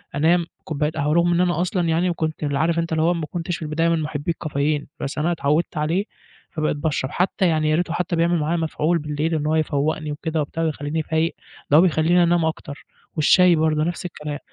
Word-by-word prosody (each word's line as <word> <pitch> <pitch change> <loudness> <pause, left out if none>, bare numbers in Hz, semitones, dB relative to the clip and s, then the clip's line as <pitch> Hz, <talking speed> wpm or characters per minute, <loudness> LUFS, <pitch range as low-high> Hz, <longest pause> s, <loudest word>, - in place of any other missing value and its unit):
أنام 165 +4 +3 0.2
كوباية 150 0 -1
قهوة 150 -1 -1
رغم 170 +1 +3
إن 170 - +2
أنا 175 -2 +1
أصلًا 180 -1 0
يعني 175 +2 +1
كنت 155 -2 -3
ال 145 -1 -1
عارف 165 +3 +1
أنت 165 0 -2
اللي 160 0 +1
هو 170 +2 +3
ما 165 -3 -3
كنتش 175 0 -3
في - - -15
البداية 160 +2 0
من 165 -1 +1
محبي 150 +1 -2
الكافيين 150 -1 -2
بس 140 - -4
أنا 160 +3 +1
اتعوّدت 155 +1 0
عليه 165 +7 0 0.5
فبقيت 155 -1 -1
باشرب، 145 -3 -2
حتى 185 +1 +1
يعني 155 -2 +1
ياريته 165 +2 0
حتى 175 0 -1
بيعمل 170 +1 +2
معايا 155 +3 0
مفعول 160 +1 0
بالليل 150 +2 -2
إن 150 -1 -2
هو 155 - +2
يفوقني 155 0 -1
وكده 160 +1 -2
وبتاع 160 +3 -3
ويخليني 155 0 -2
فايق، 160 +2 0 0.4
ده 150 - +8
بيخليني 175 0 +3
أنام 170 -1 +2
أكتر 155 -2 -5 0.3
والشاي 175 +3 +5
برضو 155 -1 +1
نفس 175 +3 -2
الكلام 150 -4 -5
160 Hz, 205 wpm, -22 LUFS, 150-170 Hz, 0.5 s, ده